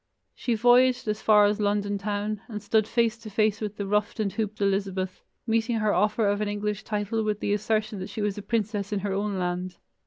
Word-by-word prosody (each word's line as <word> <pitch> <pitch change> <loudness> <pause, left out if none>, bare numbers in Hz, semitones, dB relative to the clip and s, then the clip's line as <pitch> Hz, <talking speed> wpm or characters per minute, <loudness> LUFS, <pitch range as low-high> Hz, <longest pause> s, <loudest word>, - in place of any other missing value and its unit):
She 240 - -1
voyaged 245 +2 +4
as 215 0 -1
far 210 -1 +6
as 205 +1 +1
London 205 -1 0
town, 205 +1 -2
and 210 -3 -5
stood 215 0 +2
face 235 -1 +1
to 225 -1 -9
face 215 0 +1
with 210 -1 -4
the 200 - -3
ruffed 210 +2 0
and 200 -3 0
hooped 215 -1 -3
Elizabeth, 195 -2 -1 0.2
meeting 230 +1 +1
her 215 -2 +1
offer 210 +2 +2
of 205 +1 +1
an 210 - 0
English 205 0 -2
title 210 +1 -1
with 210 -1 -1
the 205 - 0
assertion 215 0 -1
that 185 - -6
she 220 - -4
was 205 -1 0
a 205 - -6
princess 210 -1 -2
in 205 -2 -1
her 200 0 -2
own 200 0 -1
land. 180 0 -3
210 Hz, 220 wpm, -26 LUFS, 200-220 Hz, 0.2 s, far